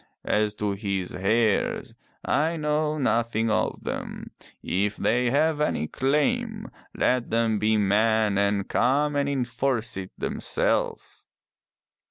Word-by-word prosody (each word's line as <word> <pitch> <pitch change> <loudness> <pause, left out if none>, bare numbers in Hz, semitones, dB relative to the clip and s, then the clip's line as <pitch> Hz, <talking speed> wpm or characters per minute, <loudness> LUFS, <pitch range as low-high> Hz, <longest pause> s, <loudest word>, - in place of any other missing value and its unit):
As 105 0 +1
to 105 -1 -1
his 100 -2 -3
heirs, 110 +2 +1 0.3
I 160 +3 +1
know 150 0 0
nothing 115 -4 +1
of 110 +1 -1
them. - - -5 0.3
If 100 +3 -1
they 120 +2 +1
have 150 +3 +2
any 80 - 0
claim, 215 - -1 0.3
let 125 -1 +1
them 115 -2 +1
be 110 0 +2
men 105 +1 +2
and 100 -1 +1
come 145 +4 +1
and 140 0 +1
enforce 125 -3 -1
it 95 -1 -5
them - - -3
selves. - - -1
115 Hz, 125 wpm, -25 LUFS, 105-145 Hz, 0.3 s, have